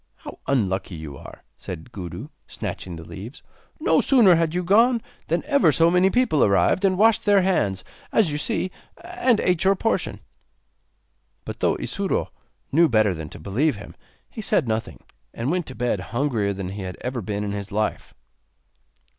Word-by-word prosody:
'How - - -11
unlucky 95 -8 0
you 80 -3 -8
are,' - - -12
said 80 +9 -8
Gudu, 90 -7 -7 0.2
snatching 90 -2 -6
the 80 -1 -10
leaves; 100 - -9 0.4
'no - - +3
sooner 235 -9 +5
had 165 0 +1
you 180 - 0
gone 230 +7 +4 0.3
than 170 +2 0
ever 280 - +4
so 165 +4 +4
many 180 +2 +4
people 235 - +2
arrived, 100 - +3
and 190 -2 +3
washed 220 +2 +4
their 200 -2 +4
hands, 100 - 0 0.3
as 200 -8 +3
you 145 - -2
see, 185 +4 -1 0.3
and 345 - +1
ate 180 -2 +1
your 195 +1 +4
portion.' 225 +4 -1 1.3
But, - - -7
though - - +2
Isuro 200 -1 -2 0.4
knew 165 +3 +4
better 110 -5 +3
than 80 -2 -7
to - - -11
believe 120 - 0
him, 100 - -11 0.3
he - - -8
said - - +1
nothing, 110 0 -3 0.3
and 120 +5 -2
went 180 -1 -1
to 130 - -8
bed 120 -5 -1
hungrier 115 0 -1
than 95 -2 -5
he 100 +1 -6
had 90 -1 -6
ever 125 -1 -3
been 105 +1 -3
in 100 - -3
his 100 0 -5
life. 105 +1 -2
130 Hz, 175 wpm, -23 LUFS, -, 1.3 s, sooner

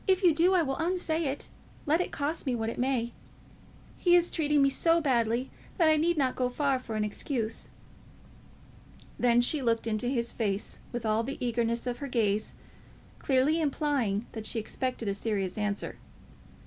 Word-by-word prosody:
If 380 0 +3
you 350 -3 +6
do, 350 +5 +3
I 350 - +4
will 270 -3 -2
unsay 335 -1 0
it, 275 0 -3 0.4
let 315 +4 +3
it - - -3
cost 300 +1 -3
me 255 - +1
what 225 -1 -2
it - - -8
may. 245 -2 0 0.9
He 350 -1 +5
is 350 0 +3
treating 295 -3 +2
me 275 - +5
so 330 +4 +3
badly 245 -4 +1 0.3
that 330 -4 +5
I 310 - +5
need 330 +2 +1
not 265 -3 +1
go 250 -1 0
far 275 0 0
for 230 -3 -6
an 215 - 0
excuse." 225 +1 -2 1.5
Then 240 -1 +4
she 280 +4 +2
looked 230 -3 +1
into 225 +1 -1
his 235 -2 -1
face 205 -3 -2
with 240 -1 -4
all 215 +1 +2
the 270 +4 -5
eagerness 235 -1 -1
of 245 -1 -3
her 285 - -4
gaze, 215 -4 0 0.6
clearly 280 +5 +2
implying 275 -8 0
that 220 -1 -6
she - - -2
expected 235 +1 -3
a 200 - +1
serious 195 -3 -2
answer. 210 -1 -3
255 Hz, 180 wpm, -29 LUFS, 230-300 Hz, 1.5 s, you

